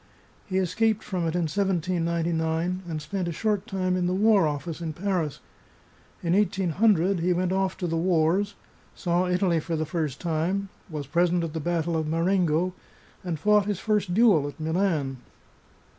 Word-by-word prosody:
He 190 - -1
escaped 215 +4 +1
from 180 -3 -2
it 160 - -2
in 175 - +1
1799, 170 -1 0
and 155 -2 -3
spent 175 +4 -3
a - - -2
short 210 +4 -1
time 185 -3 -1
in 180 -1 0
the 180 - 0
War 205 -3 +4
Office 150 +3 -4
in 160 -2 -3
Paris. 175 -4 -2 0.8
In 170 0 +1
1800 195 -1 +2
he 180 +2 +2
went 180 +1 0
off 190 0 0
to 185 - -3
the 165 -1 -1
wars, 175 +3 +1 0.4
saw 175 +1 0
Italy 180 -2 +2
for 165 +2 -3
the 155 0 -1
first 155 -4 -3
time, 175 +4 -1 0.2
was 150 -3 -5
present 175 +4 +1
at 160 -2 -4
the 160 - -2
battle 170 +1 -1
of 160 -1 -1
Marengo, 170 +1 +1 0.5
and 175 -3 -3
fought 210 +5 +3
his 205 -3 -1
first 210 -3 0
duel 200 -11 +5
at 145 - -9
Milan. 160 -5 0
175 Hz, 170 wpm, -26 LUFS, 160-190 Hz, 0.8 s, duel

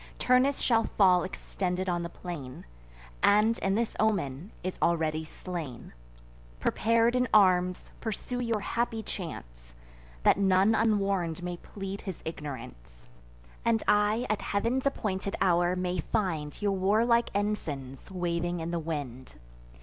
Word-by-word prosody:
Turnus 255 +2 +3
shall 230 -2 +2
fall 185 -3 +4
extended 185 0 -3
on 175 -1 0
the 170 - -4
plain, 150 -9 -8 0.6
And, 215 +3 +4
in 195 0 +1
this 230 +1 -1
omen, 190 -5 0
is 185 0 -4
already 160 -2 +1
slain. 160 -5 -7 0.7
Prepar'd 230 - +2
in 250 0 +2
arms, 180 -3 +3
pursue 240 +2 -4
your 230 -3 -1
happy 230 +1 -1
chance; - - -8 0.5
That - - +5
none 195 +2 +4
unwarn'd 195 -6 +1
may 175 0 -3
plead 195 +2 -7
his 190 -4 -7
ignorance, 115 - -8 0.5
And 230 -1 +2
I, 210 +3 +3
at 215 - -1
Heav'n's 235 +7 0
appointed 200 -7 -2
hour, 175 -1 +3
may 180 0 -2
find 160 -5 -2
Your 205 -1 +1
warlike 220 +5 +3
ensigns 145 -11 -3
waving 175 -1 -2
in 165 +1 -3
the 170 - -1
wind. 140 - -5
185 Hz, 130 wpm, -29 LUFS, 165-215 Hz, 0.7 s, That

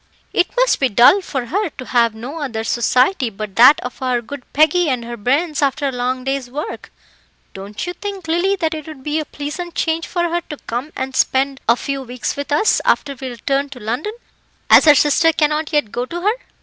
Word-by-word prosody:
"It 360 - +2
must - - +3
be 270 - +2
dull 245 - +6
for 265 -8 -4
her 395 - -1
to 255 - -7
have 235 -3 +2
no 255 +9 -7
other 230 -6 -3
society 250 - +2
but 205 -2 -7
that 255 +5 +8
of 250 +1 -8
our 255 -2 +1
good 250 +3 -10
Peggy 315 +3 +3
and 250 -3 -2
her 235 0 -6
bairns 280 +8 0
after 280 +1 +1
a - - -1
long 255 +1 -2
day's 270 -1 -2
work. 290 +5 -6 0.6
Don't 200 +6 -6
you 355 - -4
think, 395 -3 -7
Lily, 345 +5 +1
that 325 -4 -1
it 310 -1 -7
would 300 -4 -10
be 300 +2 -1
a 310 - -3
pleasant 305 +5 -6
change 325 0 -1
for 345 -1 -1
her 345 +1 -1
to 300 - -6
come 245 +6 -4
and 260 0 -4
spend 270 +1 +1
a 235 - +6
few 275 +3 -4
weeks 250 -1 -4
with 285 +1 -6
us 300 +9 +3
after 280 - +1
we 265 0 -7
return 275 +4 -2
to 265 -3 -10
London, 245 - -3 0.6
as - - +8
her 300 -2 +8
sister 300 +4 +4
cannot 305 0 0
yet 295 -9 0
go 245 +1 -3
to 345 +4 -5
her?" 415 +4 +2
280 Hz, 215 wpm, -19 LUFS, 245-320 Hz, 0.6 s, that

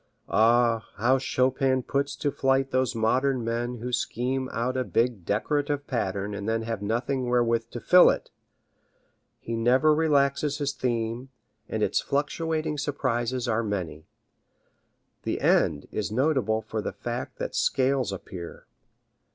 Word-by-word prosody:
Ah, 115 0 +3
how 125 +5 +2
Chopin 130 0 +1
puts 140 +2 -1
to 145 - -1
flight 135 0 +1
those 130 -2 +1
modern 125 +3 +1
men 120 +2 -2
who 125 +2 -5
scheme 130 +2 -1
out 125 +2 -1
a 130 - +1
big 115 -6 0
decorative 145 - -1
pattern 100 -4 -2
and 100 +1 -4
then 115 0 0
have 115 -2 -4
nothing 120 +4 -1
wherewith 115 -1 +1
to 120 - -6
fill 180 +8 +7
it! - - -2 1.1
He 115 - -5
never 130 +7 +4
relaxes 145 -2 +2
his 145 -1 -1
theme, 120 0 -2 0.4
and 110 -1 -1
its - - +1
fluctuating 155 +1 -1
surprises 130 -4 -1
are 115 -1 +1
many. 90 -7 -4 1.1
The - - -2
end 75 -2 +2
is 105 -1 -3
notable 125 -4 +1
for 110 0 -4
the - - -4
fact - - -5
that - - -4
scales 130 -4 +1
appear. 90 -2 -8
125 Hz, 140 wpm, -26 LUFS, 115-135 Hz, 1.1 s, fill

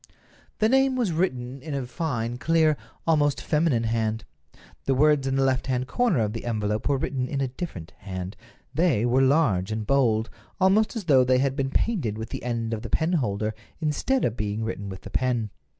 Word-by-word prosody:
The 215 - +3
name 265 +2 +3
was 240 -8 0
written 135 -6 -2
in 150 0 -5
a 135 -2 -2
fine, 120 -3 -3
clear, 160 0 +3 0.3
almost 150 -3 +2
feminine 150 -7 +1
hand. 110 -1 -1 0.6
The 135 - +2
words 145 0 +3
in 135 - 0
the 135 - +2
left 130 -1 +1
hand 130 -1 0
corner 235 - +2
of 105 -1 -1
the 115 - -6
envelope 105 0 -1
were 140 - +3
written 130 -1 -2
in 140 - -3
a 135 - +1
different 125 - -7
hand. 95 0 -6 0.4
They 150 -7 +2
were 125 +2 +3
large 130 - +3
and 110 0 -2
bold; 115 -4 +2 0.3
almost 200 +5 +3
as 225 - -3
though 135 -7 +5
they 130 0 +3
had 135 +1 +1
been 135 -2 -1
painted 135 - 0
with 110 0 -5
the - - -5
end 115 -2 -2
of 110 - -3
the 115 - -6
penholder 110 - 0 0.3
instead 165 - 0
of 115 - -1
being 105 0 -2
written 100 -3 -4
with 95 -1 -8
the - - -10
pen. 120 -5 0
130 Hz, 200 wpm, -25 LUFS, 110-155 Hz, 0.6 s, though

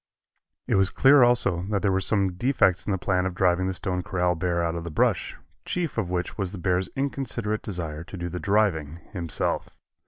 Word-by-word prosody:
It - - -1
was 95 0 +3
clear 135 +1 +5
also 120 -8 +4
that 100 -2 -1
there 100 - +3
were 95 - +2
some 95 -1 +2
defects 95 -3 +1
in - - 0
the 95 - +1
plan 90 0 0
of 95 - -5
driving 90 0 +2
the 95 - -1
Stone 90 0 -2
Corral 90 -1 0
bear 85 0 -1
out 85 -1 -1
of 85 -1 -4
the 85 - -5
brush, 75 - 0 0.3
chief 170 -7 -3
of 110 -6 -2
which 90 +3 -3
was 95 -2 -1
the 100 - -7
bear's 90 +1 0
inconsiderate 130 -6 -2
desire 80 -5 -5
to 95 - -9
do 85 0 -4
the 90 +1 -5
driving 95 -8 +1 0.2
himself. 85 -5 -2
95 Hz, 210 wpm, -25 LUFS, 90-105 Hz, 0.3 s, clear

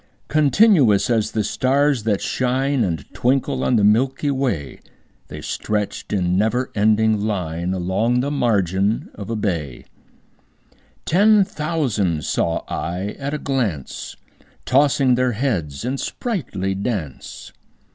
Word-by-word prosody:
Continuous 150 - +4
as 110 -3 +1
the 110 - -1
stars 135 -1 +1
that 105 -3 +1
shine 130 +1 0
And 80 -7 -2
twinkle 130 +1 0
on 125 - +2
the 105 - +3
milky 130 +7 +2
way, 125 - -2 0.5
The - - -9
stretched 105 -1 -3
in 90 -3 +1
never 110 +6 0
ending 110 0 +3
line 90 -5 -2
Along 95 +7 0
the 140 +3 -1
margin 100 -6 0
of 100 0 -8
a 115 - -1
bay: 85 - -3 1.2
Ten 205 +4 +5
thousand 125 - -1
saw 85 - -1
I 90 +4 -3
at 140 +2 -3
a - - -1
glance, 115 - -3 0.5
Tossing 135 -1 +3
their 125 0 +1
heads 100 - -2
in 130 +2 -2
sprightly 120 - -3
dance. 95 - -5
115 Hz, 125 wpm, -21 LUFS, 95-135 Hz, 1.2 s, Ten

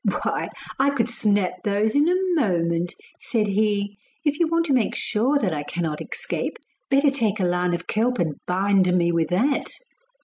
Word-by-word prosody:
'Why - - -1 0.3
I 275 +1 +4
could 255 -5 0
snap 205 -5 +1
those 210 +3 +1
in 295 +3 +4
a 360 - +3 0.2
moment,' 175 - 0 0.2
said 215 -4 0
he; 205 0 0 0.3
'if 295 +1 +1
you 340 - +3
want 335 +1 +1
to 290 - +1
make 245 -5 +1
sure 250 +7 +1
that 195 - 0
I 150 - -2
cannot 155 0 -3
escape, - - -4 0.3
better 275 +1 +4
take 225 -6 0
a 185 - +2
line 180 0 +1
of - - -7
kelp 245 +4 0
and 160 -5 0
bind 190 0 +2
me 170 -1 +2
with 165 -1 +1
that. 245 +11 +1
205 Hz, 180 wpm, -23 LUFS, 180-265 Hz, 0.3 s, I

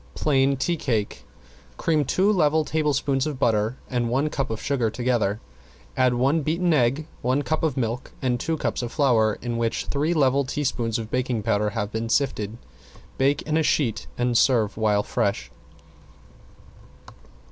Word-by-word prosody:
~PLAIN 135 -2 +2
TEA 170 +6 0
CAKE~ 115 -8 -2 0.5
Cream 155 -3 +1
two 190 +9 +2
level 155 -4 +2
tablespoons 145 -3 0
of 150 -3 -4
butter 115 -1 +1
and 120 -2 -1
one 140 +5 0
cup 135 - -2
of 110 -1 -3
sugar 130 -6 0
together, 110 -3 0 0.6
add 130 -1 +3
one 135 +6 +2
beaten 170 +3 +1
egg, 135 +2 +2 0.2
one 130 +4 +1
cup 155 +4 -1
of 155 -4 -1
milk 120 0 -2
and 125 -2 0
two 160 +4 -1
cups - - -2
of 120 -1 -4
flour 115 -7 +2
in 120 -1 -2
which 115 -1 -1
three 150 +4 0
level 140 -2 +3
teaspoons 125 -4 -2
of 110 -1 -6
baking 125 -3 -1
powder 105 -1 +1
have 105 0 -2
been 115 +1 -3
sifted. 115 -5 0 0.6
Bake 140 +2 +2
in 155 0 0
a - - +3
sheet, 145 -7 0
and 120 0 0
serve 115 -4 +3
while 105 -2 +1
fresh. 100 0 -2
130 Hz, 160 wpm, -24 LUFS, 115-145 Hz, 0.6 s, add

